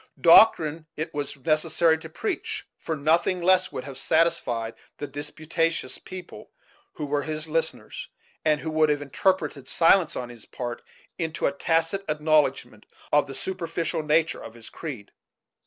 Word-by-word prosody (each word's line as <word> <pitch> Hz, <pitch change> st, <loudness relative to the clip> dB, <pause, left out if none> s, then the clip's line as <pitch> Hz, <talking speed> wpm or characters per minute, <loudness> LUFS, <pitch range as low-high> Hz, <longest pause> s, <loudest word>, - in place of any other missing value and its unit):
Doctrine 165 Hz, -4 st, +6 dB
it 155 Hz, +2 st, -4 dB
was 145 Hz, -1 st, -4 dB
necessary 160 Hz, +3 st, +2 dB
to 160 Hz, -, -10 dB
preach, 375 Hz, -, -4 dB
for 160 Hz, -, -3 dB
nothing 165 Hz, +5 st, +2 dB
less 185 Hz, +1 st, +3 dB
would 125 Hz, -, -5 dB
have 135 Hz, -1 st, -8 dB
satisfied 130 Hz, -8 st, +1 dB, 0.2 s
the 145 Hz, -, -4 dB
disputatious 155 Hz, +1 st, -3 dB
people 185 Hz, -1 st, -10 dB, 0.4 s
who 150 Hz, -, -5 dB
were 145 Hz, 0 st, 0 dB
his 155 Hz, +2 st, -3 dB
listeners, 165 Hz, +1 st, -3 dB, 0.3 s
and 155 Hz, -1 st, +2 dB
who 160 Hz, -, -4 dB
would 155 Hz, 0 st, +3 dB
have 145 Hz, -1 st, 0 dB
interpreted 150 Hz, -1 st, -1 dB
silence 170 Hz, 0 st, +4 dB
on 125 Hz, -1 st, -4 dB
his 120 Hz, -2 st, -12 dB
part 120 Hz, -1 st, -5 dB, 0.4 s
into 165 Hz, -1 st, -2 dB
a -, -, +3 dB
tacit 165 Hz, +6 st, 0 dB
acknowledgment 150 Hz, -7 st, +1 dB, 0.2 s
of 145 Hz, -1 st, +4 dB
the 135 Hz, -, -7 dB
superficial 165 Hz, +1 st, -3 dB
nature 155 Hz, +1 st, +1 dB
of 115 Hz, -, -10 dB
his 115 Hz, -1 st, -13 dB
creed. 130 Hz, -11 st, -7 dB
155 Hz, 150 wpm, -25 LUFS, 140-165 Hz, 0.4 s, Doctrine